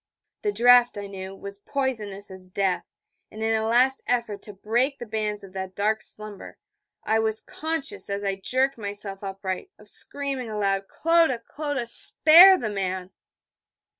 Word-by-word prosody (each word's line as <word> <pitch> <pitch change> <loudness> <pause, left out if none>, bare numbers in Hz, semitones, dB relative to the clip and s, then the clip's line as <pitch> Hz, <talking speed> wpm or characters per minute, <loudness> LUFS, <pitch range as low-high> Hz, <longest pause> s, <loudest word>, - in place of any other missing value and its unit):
The 415 - 0
draught, 245 - +5
I 205 - -5
knew, 195 -1 -8
was 200 +1 -9
poisonous 210 -5 -3
as 185 -1 -10
death: 190 -1 -1 0.4
and 220 +1 -7
in 225 0 +1
a 220 0 0
last 255 +3 +3
effort 235 -5 -1
to 210 - -9
break 240 +8 -1
the 240 - -7
bands 210 -2 -3
of 190 -1 -13
that 190 -1 -6
dark 215 +2 0
slumber, 215 -2 -5 0.5
I 220 0 +1
was 220 0 0
conscious, 320 - -4
as 200 0 -3
I 195 -1 0
jerked 260 +2 +1
myself 200 -1 -4
upright, 195 - -5
of - - -17
screaming 275 -4 -3
aloud: 195 -2 -1
'Clodagh! 325 -8 +1
Clodagh! 290 -4 -4 0.3
_Spare 360 +5 +8
the 215 -3 -3
man...! 185 -2 -3
215 Hz, 160 wpm, -25 LUFS, 200-255 Hz, 0.5 s, Spare